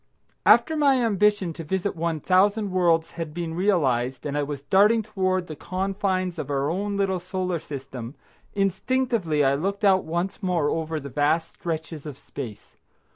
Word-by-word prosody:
After 320 - +6
my 285 -3 +4
ambition 205 -4 +2
to 165 - -7
visit 190 +5 -2
one 165 -2 -2
thousand 200 +4 +3
worlds 170 -3 +2
had 160 -2 -6
been 170 -2 -3
realised, 135 -10 +1
and 145 -1 -2
I 145 - +1
was 140 -1 -4
darting 210 +6 +4
toward 185 -3 -1
the 155 - -7
confines 185 0 -2
of 145 - -4
our 140 +1 0
own 200 +3 -2
little 190 -2 +1
Solar 180 -1 -2
System, 135 -3 -7 0.4
instinctively 195 - +1
I 135 - +4
looked 195 +8 -2
out 190 -1 +5
once 175 +6 -3
more 175 -6 +1
over 160 -1 -2
the 140 -1 -8
vast 150 +4 +1
stretches 160 -2 -5
of 140 -3 -7
space. 125 -7 -9
175 Hz, 165 wpm, -25 LUFS, 150-195 Hz, 0.4 s, After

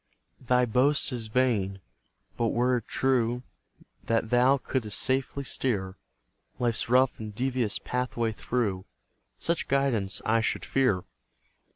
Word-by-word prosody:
Thy 125 0 +2
boast 130 +6 +2
is 120 -3 -4
vain; 110 -5 +1 0.6
but 115 - 0
were 125 +2 +2
it 115 - -7
true 125 -2 +1 0.6
That 115 0 0
thou 125 +3 +5
couldst 120 -5 -2
safely 135 +1 0
steer 100 -9 -2 0.6
Life's 120 -2 0
rough 130 +1 +3
and 105 -2 -7
devious 125 -3 0
pathway 125 -2 -2
through, 105 -4 -2 0.5
Such 170 0 -1
guidance 130 -8 +1
I 115 +1 +3
should - - -1
fear. 130 -10 +1
120 Hz, 120 wpm, -28 LUFS, 110-130 Hz, 0.6 s, thou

